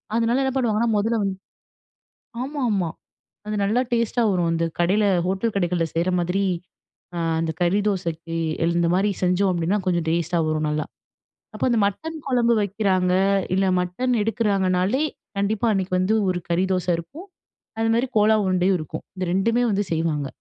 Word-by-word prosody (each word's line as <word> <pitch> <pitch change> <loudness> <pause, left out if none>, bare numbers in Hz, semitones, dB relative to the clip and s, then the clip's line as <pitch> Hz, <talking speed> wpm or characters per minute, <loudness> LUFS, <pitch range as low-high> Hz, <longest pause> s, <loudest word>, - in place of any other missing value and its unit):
அதனால 235 +3 +2
என்ன 265 - 0
பண்ணுவாங்கன்னா 235 -3 +1
முதல்ல 225 +3 +1
வந்து 195 -1 -1 1.1
ஆமா, 285 +3 -4
ஆமா. 190 -5 0 0.6
அது 210 0 -2
நல்லா 215 +5 +2
டேஸ்ட்டா 235 0 +1
வரும். 175 -2 +1
அந்த 165 0 0 0.2
கடையில 195 +5 +3 0.2
ஹோட்டல் 195 +5 -1
கடைகள்ல 175 -3 +1
செய்ற 170 +3 +1
மாதிரி 180 +3 0 0.7
அ - - -2 0.2
அந்த 165 -1 -1
கறி 175 +4 +2
தோசைக்கு 165 -4 -3 0.3
இல் 170 +1 +1
இந்த 170 -1 +2
மாதிரி 195 +3 +2
செஞ்சோம் 180 +2 +2
அப்படீன்னா 175 +4 0
கொஞ்சம் 175 -3 0
டேஸ்ட்டா 170 +1 0
வரும் 155 0 0
நல்லா. 150 0 -1 0.7
அப்போ - - -3
அந்த 235 - +2
மட்டன் 320 - -4
குழம்பு 240 -3 +3
வைக்கிறாங்க, 190 -2 +1 0.4
இல்ல 190 +1 +2
மட்டன் 215 +9 -1
எடுக்கிறாங்கனாலே 200 +1 +1 0.4
கண்டிப்பா 205 +3 0
அன்னைக்கு 190 -2 -2
வந்து 185 +4 +2 0.2
ஒரு 180 -1 -2
கறி 175 +2 +1
தோச 180 -2 -1
இருக்கும். 280 - -9 0.5
அதுமாரி 225 +3 +1
கோலா 215 +1 +5
உருண்டையும் 185 0 +2
இருக்கும். 155 +1 -6
இந்த 185 - -2
ரெண்டுமே 230 +6 +2
வந்து 205 0 0
செய்வாங்க. 160 -3 0
190 Hz, 155 wpm, -23 LUFS, 175-225 Hz, 1.1 s, கோலா